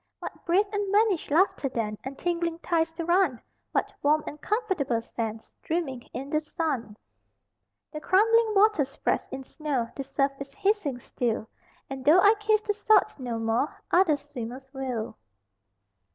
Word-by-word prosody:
What - - -8
brave 370 +5 +4
and 405 -1 -1
vanished 410 -4 +2
laughter 310 -3 +2
then 220 -4 -2
And 270 +1 -6
tingling 340 -1 -1
thighs 330 -1 0
to 330 0 -4
run, 345 -8 +3 0.3
What - - -1
warm 300 +1 +3
and 300 - -8
comfortable 380 - 0
sands 225 -1 -5
Dreaming 310 -7 -2
in 270 +4 -6
the 305 - +2
sun. 275 -9 -3 0.9
The 305 - -6
crumbling 440 +4 +4
water 415 -6 +5
spreads 275 +2 -2
in 265 0 -6
snow, 270 -5 -2
The 275 - -4
surf 275 +1 0
is 275 0 -7
hissing 400 - 0
still, 235 -2 -2 0.4
And 270 -1 -6
though 310 +7 +6
I 410 +3 +7
kiss 430 0 +2
the 420 - -1
salt 420 0 +3
no 245 -3 -3
more 225 +5 -1
Other 345 -5 +4
swimmers 260 -2 -7
will. 245 -4 -4
305 Hz, 155 wpm, -27 LUFS, 255-380 Hz, 0.9 s, I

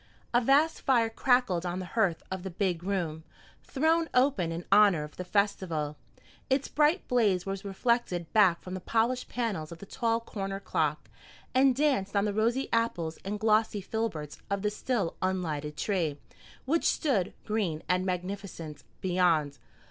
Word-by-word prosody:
A 240 - +5
vast 285 +6 +3
fire 235 -4 +2
crackled 245 -8 +2
on 175 0 -3
the 185 - -4
hearth 195 -8 +1
of 190 -1 -3
the 190 - -5
"big 180 -1 -1
room," 175 -5 -2 0.4
thrown 320 +3 +1
open 250 -10 +3
in 170 +1 -5
honor 200 -6 +6
of 150 - -10
the 180 - -5
festival. 180 -6 0 0.5
Its 270 +1 +1
bright 305 +5 +2
blaze 210 -7 +2
was 195 0 -4
reflected 195 -4 -1
back 190 -6 +4
from 185 - -7
the 185 - -3
polished 230 +6 0
panels 205 -11 -3
of 170 - -8
the 200 - -10
tall 230 +3 0
corner 195 -4 -5
clock, 155 -6 -1 0.5
and 260 0 +4
danced 260 -9 +1
on 200 +1 +3
the 205 - -1
rosy 235 +5 +1
apples 175 -9 0
and 205 +2 -3
glossy 215 0 +2
filberts 190 -8 -4
of 200 0 -1
the 210 - +1
still 210 -5 -2
unlighted 155 -6 -2
tree, 170 -8 -1 0.5
which 320 +5 +1
stood, 230 - +1
green 195 -8 -1
and 180 +2 +2
magnificent, 180 -4 -5 0.2
beyond. 170 -6 +1
195 Hz, 160 wpm, -29 LUFS, 175-230 Hz, 0.5 s, honor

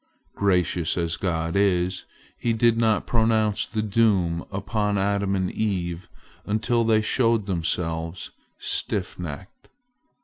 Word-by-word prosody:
Gracious 90 -4 +1
as 85 -1 0
God 85 -1 -2
is, 95 -2 +1 0.3
He 115 - -1
did 115 +1 +3
not 115 -2 +2
pronounce 110 -2 +1
the 110 -1 -2
doom 95 -6 +2
upon 100 +1 -1
Adam 100 0 +1
and 95 -1 -1
Eve 90 -5 -2 0.3
until 115 +3 +1
they 110 -1 +3
showed 115 -2 +2
themselves 85 -2 -2 0.3
stiff - - -2
necked. 85 +1 -8
100 Hz, 115 wpm, -24 LUFS, 90-110 Hz, 0.3 s, did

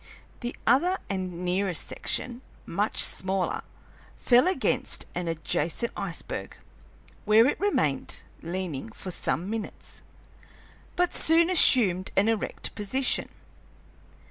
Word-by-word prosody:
The 240 0 -5
other 345 +11 +3
and 180 -2 -4
nearest 180 -1 0
section, 245 0 -3 0.2
much 205 +5 +1
smaller, 190 0 0 0.6
fell 250 +5 +4
against 375 - 0
an 175 -1 -3
adjacent 165 +6 -1
iceberg, 195 -4 -5 0.7
where 220 +2 +5
it 275 - 0
remained 405 +1 0 0.2
leaning 170 -8 -4
for 185 - -7
some 175 0 -2
minutes, 220 0 -6 0.9
but 355 0 +1
soon 335 +2 +3
assumed 200 - +6
an 205 +3 +4
erect 225 -2 -3
position. 235 +6 0
205 Hz, 105 wpm, -27 LUFS, 180-250 Hz, 0.9 s, assumed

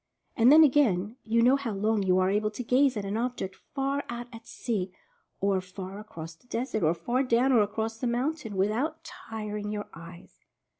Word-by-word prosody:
And 235 +3 +6
then, 315 +2 +9
again, 240 -7 +3
you 230 +1 +2
know 255 +3 +6
how 240 -6 -3
long 210 +2 +1
you 185 -1 +3
are 185 0 +3
able 210 +1 +1
to 215 +4 -6
gaze 255 +1 +3
at 200 - -3
an 200 +2 -2
object 235 -6 -3 0.2
far 275 +1 0
out 240 0 -5
at 225 0 -11
sea, 195 -6 -3 0.5
or 195 -1 +1
far 185 +1 -8
across 165 -6 -9
the 160 - -27
desert, 240 -2 -2
or 160 0 +3
far 245 +8 0
down 255 0 +3
or 240 -4 +5
across 220 +2 -2
the 250 - -1
mountain, 245 -1 -2
with 195 +2 +2
out 305 +8 -2
tiring 210 -1 -6
your 210 -1 -4
eyes. 170 +2 -12
220 Hz, 200 wpm, -28 LUFS, 195-250 Hz, 0.5 s, then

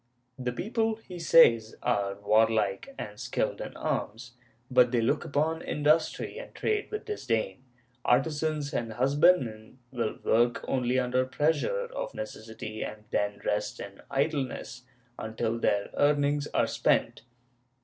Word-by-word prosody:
The 125 -1 -1
people, 220 - -1
he 185 -5 -10
says, 115 -10 +5
are 100 -5 0
warlike 110 - +1
and 105 0 -7
skilled - - -2
in - - -7
arms, 115 +3 -3 0.4
but 125 -1 +5
they 120 - +2
look 125 +7 +1
upon 155 +3 0
industry 155 +2 +1
and - - -10
trade 425 -1 -1
with 425 - -5
disdain; 115 - -2 0.4
artisans 150 +3 +1
and 115 -2 -2
husbandmen 130 -3 +2
will 115 -4 -2
work 120 +2 +2
only 125 -1 +1
under 130 0 +2
pressure 160 - 0
of - - -4
neces 110 - -7
sity 110 -1 -6
and 105 0 -7
then 105 0 -1
rest 105 0 -1
in 100 0 -9
idleness 135 -3 -2 0.3
until 110 +1 -2
their 100 -3 +1
earnings 145 0 +2
are - - +2
spent. - - +1
125 Hz, 135 wpm, -28 LUFS, 110-155 Hz, 0.4 s, says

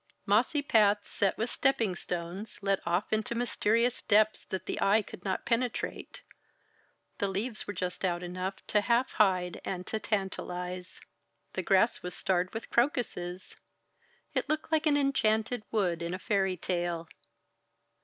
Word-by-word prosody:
Mossy 245 +9 +3
paths 210 -5 +4
set 200 -2 +1
with 225 +2 -1
stepping 255 -8 +2
stones 175 +4 -5
led 195 -1 +1
off 175 +5 0
into 220 +2 0
mysterious 235 0 +1
depths 215 0 +3
that 185 -1 -4
the - - -3
eye 210 +2 +4
could - - -11
not 190 -2 -2
penetrate: 240 0 -2 1.0
the 200 - +1
leaves 215 +4 -3
were 205 - -3
just 180 0 -3
out 175 -1 0
enough 185 +2 -4
to 210 - +2
half 235 +4 +2
hide 185 -4 +2
and 180 -1 -4
to 220 - -2
tantalize. 180 -3 -3 0.5
The - - -1
grass - - +3
was 180 0 -5
starred 185 -1 0
with 225 - -6
crocuses. 200 -8 -1 0.8
It - - -1
looked 310 +1 -1
like 315 0 +3
an 290 -1 +4
enchanted 240 -4 +1
wood 180 -6 0
in 170 +2 -2
a - - -4
fairy 190 -1 0
tale. 175 -1 -2
200 Hz, 150 wpm, -30 LUFS, 180-230 Hz, 1.0 s, paths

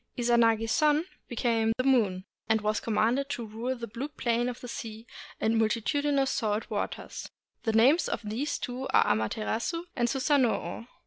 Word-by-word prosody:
Izanagi's 230 -2 +3
son 305 +1 +3 0.2
became 230 -2 +1
the 255 - 0
moon, 210 -9 +2 0.2
and 220 0 +4
was 215 0 0
commanded 235 +5 +1
to 245 -5 -3
rule 230 +4 -3
the 235 -2 -6
blue 235 +5 -5
plane 240 -4 0
of 245 - -6
the 245 - -8
sea 225 -1 -7 0.3
and 225 +1 +2
multitudinous 270 +5 +1
salt 215 -2 -1
waters. - - -4 0.4
The 225 - +1
names 260 +10 +4
of - - -2
these 275 +8 -2
two 250 +2 -4
are - - +4
Amaterasu 220 - -1
and 240 -1 +1
Susanoo. 260 -3 +1
235 Hz, 155 wpm, -29 LUFS, 220-265 Hz, 0.4 s, and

